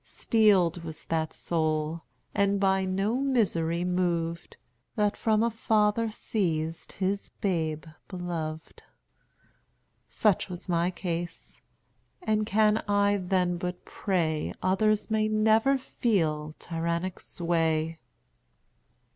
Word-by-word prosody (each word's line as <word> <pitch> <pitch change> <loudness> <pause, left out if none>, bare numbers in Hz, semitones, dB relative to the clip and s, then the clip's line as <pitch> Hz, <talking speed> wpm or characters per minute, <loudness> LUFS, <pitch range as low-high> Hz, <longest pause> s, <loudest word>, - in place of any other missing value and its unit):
Steeled 190 -7 +2
was 160 -1 -8
that 160 -1 -1
soul, 155 -1 -1 0.3
and 200 0 +2
by 190 -1 +2
no 195 +5 0
misery 175 -11 +1
moved, 170 -2 -1 0.4
That 210 -1 +1
from 220 -1 +2
a 235 - +1
father 220 0 +2
seized 165 -7 -2
his 195 +1 -2
babe 160 -5 -1 0.2
beloved. 165 -4 -5 1.3
Such 205 -3 +1
was 180 +1 -7
my 170 0 +1
case; 175 -1 -5 0.6
and 215 - 0
can 215 0 +3
I 205 0 +3
then 180 -1 0
but 180 0 -5
pray 165 -6 -1
Others 210 +4 +2
may 215 0 +2
never 220 +5 +3
feel 160 -12 -1
tyrannic 170 +3 -3
sway." 165 -2 -1
185 Hz, 105 wpm, -28 LUFS, 165-210 Hz, 1.3 s, can